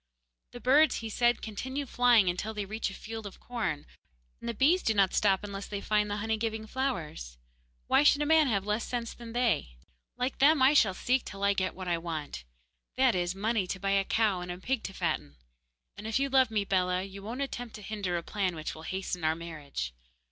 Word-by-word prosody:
'The 245 - -7
birds,' 285 +6 +5
he 225 - -4
said, 240 +2 +2
'continue 260 +6 -4
flying 240 -5 +4
until 195 +5 -2
they 205 -1 -2
reach 215 +2 -3
a - - -9
field 225 -1 -7
of 195 - -12
corn, 215 -12 -3 0.5
and 235 - -5
the - - -1
bees 320 - +4
do 220 - +1
not 195 -2 +3
stop 195 -1 +3
unless 200 -1 -6
they 205 - -4
find 210 0 +1
the 205 - -1
honey 220 +1 -1
giving 220 0 -3
flowers, 170 - -3
and - - -35 0.4
why - - +4
should 290 -1 +5
a - - -1
man 315 -1 +5
have 200 -5 0
less 210 +2 0
sense 235 -2 -3
than 235 -1 -10
they? 150 - 0 0.4
Like 255 +1 -2
them, 295 +3 +6
I 260 +2 +6
shall 200 -10 +4
seek 255 +5 +1
till 200 0 -7
I 200 0 +4
get 185 -1 -1
what 185 0 -7
I 170 -1 +1
want 155 - -5 0.5
that 260 -2 +4
is, 175 0 -1
money 210 -1 0
to 185 - -4
buy 195 +1 -1
a 195 0 +3
cow 205 -3 +1
and 180 0 -5
a 175 - -5
pig 245 +6 -1
to 195 - -5
fatten. 75 - -2 0.6
And 215 - -7
if 220 - +1
you 275 +1 +1
love 260 -2 +4
me, 210 -2 0
Bellah, 185 -1 +1
you 195 0 -9
won't 230 +7 -5
attempt 245 -4 -6
to 210 - -10
hinder 195 -4 -2
a 170 - -4
plan 190 -3 -1
which 155 -1 -4
will 160 - -10
hasten 185 -2 -3
our 155 0 +2
marriage. 150 - -6
210 Hz, 225 wpm, -30 LUFS, 185-240 Hz, 0.6 s, them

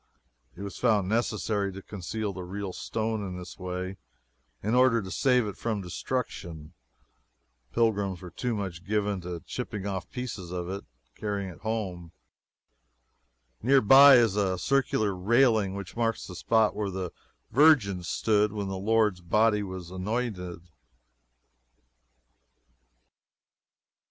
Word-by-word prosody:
It 100 - -8
was 100 - -7
found 105 -6 +2
necessary 105 -2 0
to 95 - -8
conceal 100 +2 -4
the 95 - -6
real 95 +1 -5
stone 110 +1 -2
in 90 -2 -5
this 90 +1 -9
way 90 +1 -4 0.7
in 110 +3 0
order 125 -2 +5
to 95 -3 -6
save 125 -3 +3
it 105 - -6
from 110 -3 -2
destruction. 85 - -4 1.0
Pilgrims 100 -5 +1
were 90 -2 -10
too 120 +7 -2
much 95 -4 -5
given 105 -2 -1
to 85 -1 -6
chipping 105 -5 -5
off 95 -2 -4
pieces 125 - -5
of 90 0 -4
it 100 - -3 0.3
to - - -27
carry 100 -4 -3
home. 95 -6 -4 1.5
Near 135 +4 +5
by 135 +4 +9
is 115 -5 +4
a 95 -3 +1
circular 110 -1 +1
railing 110 0 +3
which 100 -2 -7
marks 115 -1 -1
the 90 - -9
spot 110 +4 +2
where 105 -2 -2
the 95 -2 -4 0.4
Virgin 125 - +5
stood 105 +4 +1
when 100 -2 -3
the 95 -1 -4
Lord's 105 -2 +2
body 105 +4 +3
was 95 -3 -7
anointed. 95 -3 -3
100 Hz, 130 wpm, -28 LUFS, 95-115 Hz, 1.5 s, by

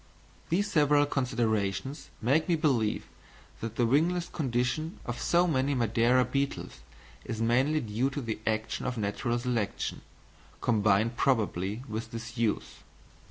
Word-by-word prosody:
These 200 +5 +1
several 145 -1 +4
considerations 120 -2 -1
make 150 +8 +2
me 170 - +4
believe 130 -9 +1 0.5
that 115 0 -5
the 120 - +2
wingless 170 +8 +2
condition 135 +3 -1
of 120 0 -4
so 175 +1 +3
many 140 -4 +1
Madeira 120 +2 +3
beetles 140 - -2 0.4
is 110 - -5
mainly 130 +7 +2
due 115 +3 0
to 140 - -4
the 115 -3 -3
action 110 0 -1
of 125 -1 -2
natural 110 +3 -1
selection, 120 -4 -2 0.6
combined 110 +1 +2
probably 110 -4 0
with 110 0 -4
disuse. 115 -1 -3
120 Hz, 125 wpm, -29 LUFS, 110-140 Hz, 0.6 s, several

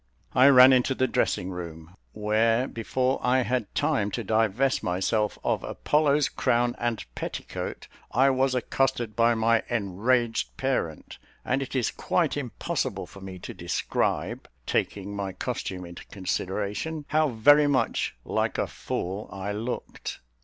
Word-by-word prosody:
I 130 +2 +7
ran 130 -1 +9
into 130 +1 +2
the 130 - +2
dressing 95 -5 0
room, 85 -1 -8 0.2
where, 110 +4 +2
before 130 +3 -1
I 130 +1 +3
had 125 -4 -2
time 105 -1 +1
to 115 - -2
divest 110 +5 +1
myself 100 +4 0
of - - 0
Apollo's 150 -1 +2
crown 120 0 +1
and 120 -2 -2
petticoat, - - -5 0.2
I 135 +4 +4
was 130 0 +1
accosted 120 -3 0
by 115 +1 +4
my 115 0 +3
enraged 115 +2 0
parent, 125 - -2 0.3
and 135 - +1
it 135 - -5
is 125 -4 +1
quite - - 0
impossible - - -3
for 100 - -14
me 95 -1 -8
to - - -6
describe - - -2 0.2
(taking 100 0 -1
my 100 -2 -3
costume 90 0 -4
into 85 0 -10
consideration) 100 - -3
how 155 0 +3
very 145 +6 +5
much 130 - 0
like - - -1
a - - +1
fool 95 +4 -4
I 100 +2 -4
looked. 110 +4 -5
115 Hz, 140 wpm, -27 LUFS, 100-130 Hz, 0.3 s, ran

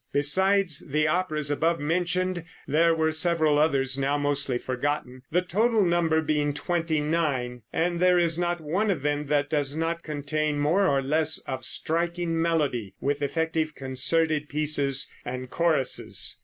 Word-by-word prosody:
Besides 190 +3 +3
the 150 +1 +1
operas 155 -3 -1
above 165 +3 +1
mentioned 175 +3 -1 0.2
there 165 +3 +3
were 160 0 +1
several 160 -2 +2
others 135 -3 +2
now 140 +2 +1
mostly 140 -3 0
forgotten, 130 0 -3
the 180 +3 +1
total 215 +3 +2
number 165 -2 +2
being 145 -1 0
twenty 165 0 -1
nine; 145 -6 -1
and 170 +1 0
there 180 0 +4
is 170 -2 +3
not 175 0 0
one 180 +8 -1
of 165 -9 -1
them 145 0 -1
that 145 0 0
does 145 -2 0
not 165 +1 -2
contain 150 0 -2
more 170 +7 +2
or 135 -1 +1
less 155 +3 +1
of 130 -1 -5
striking 170 +3 -1
melody, 145 - -1
with 145 +1 -1
effective 160 +1 -1
concerted 150 +3 0
pieces 145 -2 +1 0.2
and 125 0 -6
choruses. 165 -6 0
155 Hz, 150 wpm, -26 LUFS, 145-170 Hz, 0.2 s, there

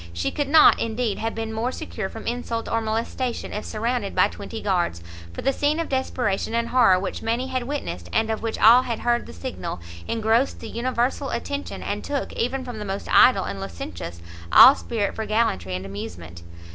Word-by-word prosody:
She 85 +1 -2
could 290 -2 -2
not, 315 +1 +7
indeed, 225 -2 -1
have 225 0 -2
been 225 0 -4
more 230 +3 -1
secure 205 -6 -5
from 225 - -9
insult 235 -1 -3
or 230 - 0
molestation 230 +3 -3
if 210 - -4
surrounded 230 -1 -2
by - - +4
twenty 210 +3 -7
guards; 175 - -1 0.3
for - - -7
the 270 - +2
scene 295 +3 +1
of 330 - -2
desperation 245 -5 -1
and 235 0 0
horror 235 -8 +5
which 190 +1 -4
many 240 +4 -1
had 255 -1 -1
witnessed, 90 - -5
and 225 0 +1
of 220 - -3
which 225 0 -3
all 235 +3 +7
had 235 -3 -4
heard 240 0 +1
the - - -9
signal, 90 +2 -6 0.3
engrossed 225 +3 +1
the - - -8
universal 255 +3 -1
attention, 285 0 -4
and 205 +1 -3
took, 285 -1 -3
even 260 +2 -2
from 245 -3 -6
the - - -4
most 195 -1 -4
idle 255 - +6
and 100 0 -5
licentious, 85 -2 -7 0.3
all 265 - +10
spirit 225 -7 -2
for 220 - -4
gallantry 95 - 0
and 90 +1 -5
amusement. 90 -4 -8
225 Hz, 195 wpm, -24 LUFS, 195-250 Hz, 0.3 s, all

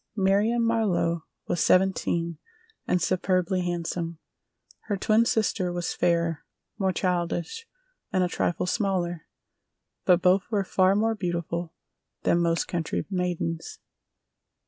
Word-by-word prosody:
Marion 210 +4 +2
Marlowe 185 -8 +1 0.2
was 175 - +1
seventeen 170 -3 +2 0.5
and 180 - +2
superbly 185 +1 +1
handsome. 170 -1 -3 0.7
Her 205 - -1
twin 215 +4 +3
sister 210 -5 +1
was 175 -1 -2
fairer, 170 -2 +1 0.4
more 190 -1 +2
childish 180 - -2 0.4
and 185 -2 +2
a - - +2
trifle 175 0 -1
smaller, 180 -4 -1 0.8
but 180 -2 +5
both 185 +1 +3
were 205 -3 +1
far 190 0 +3
more 225 +2 +2
beautiful 170 -3 -3 0.5
than 170 - +3
most 170 -1 +1
country 170 -3 -2
maidens. 175 -3 -2
180 Hz, 115 wpm, -26 LUFS, 170-195 Hz, 0.8 s, but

